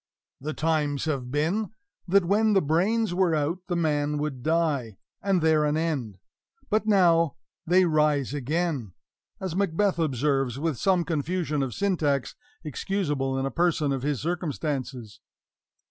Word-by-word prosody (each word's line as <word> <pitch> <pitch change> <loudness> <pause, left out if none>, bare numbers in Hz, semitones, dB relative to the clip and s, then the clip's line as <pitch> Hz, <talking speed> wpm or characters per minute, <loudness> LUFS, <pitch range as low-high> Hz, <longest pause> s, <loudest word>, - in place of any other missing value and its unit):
"The 155 +3 -5
times 155 -3 0
have 135 -5 -2
been, 170 +10 -1 0.3
That, 195 0 +4
when 210 +4 +3
the 195 - +4
brains 185 +7 +1
were 180 -3 +2
out, 155 +4 -1
the 175 - -1
man 150 -3 0
would 145 -4 -3
die, 145 - 0 0.2
And 190 -4 +1
there 160 -1 +4
an 150 +1 +1
end; 140 - -2 0.5
but 215 +1 +1
now 170 -6 +4 0.3
they 180 +2 +5
rise 150 -4 +2
again," 145 - -2 0.5
as 185 -3 -4
Macbeth 195 0 +1
observes, 135 -4 0
with 155 -3 -2
some 185 -3 +2
confusion 160 -1 -1
of 130 -3 -3
syntax, 155 -9 0 0.3
excusable 150 -4 -2
in 135 - -1
a 135 - -2
person 160 -2 +1
of 135 -2 -1
his 145 -1 -1
circumstances. 140 - -3
155 Hz, 145 wpm, -26 LUFS, 140-175 Hz, 0.5 s, they